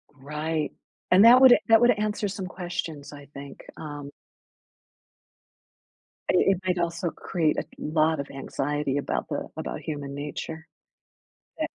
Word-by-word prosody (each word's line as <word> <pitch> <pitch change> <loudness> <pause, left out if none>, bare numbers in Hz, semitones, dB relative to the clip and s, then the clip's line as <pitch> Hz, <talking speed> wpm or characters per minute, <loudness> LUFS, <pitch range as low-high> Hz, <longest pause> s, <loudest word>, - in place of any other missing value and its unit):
Right. 150 +3 -3 0.4
And 190 +4 +7
that 245 +2 +9
would 260 -2 +8
that 225 0 +8
would 240 +1 +6
answer 210 -1 -1
some 195 -1 -5
questions, 170 -6 -5
I 145 -1 -11
think, 140 0 -10 0.2
um 145 -2 -7 2.2
i - - +1
it 195 +1 +3
might 180 -1 +1
also 170 0 -1
create 160 -2 -1
a - - -2
lot 155 0 +1
of 140 - -4
anxiety 140 +1 -2
about 145 - -2
the - - -3
about - - -4
human 145 -3 -5
nature. 150 +2 -6 0.9
Tha - - 0
160 Hz, 135 wpm, -26 LUFS, 145-185 Hz, 2.2 s, that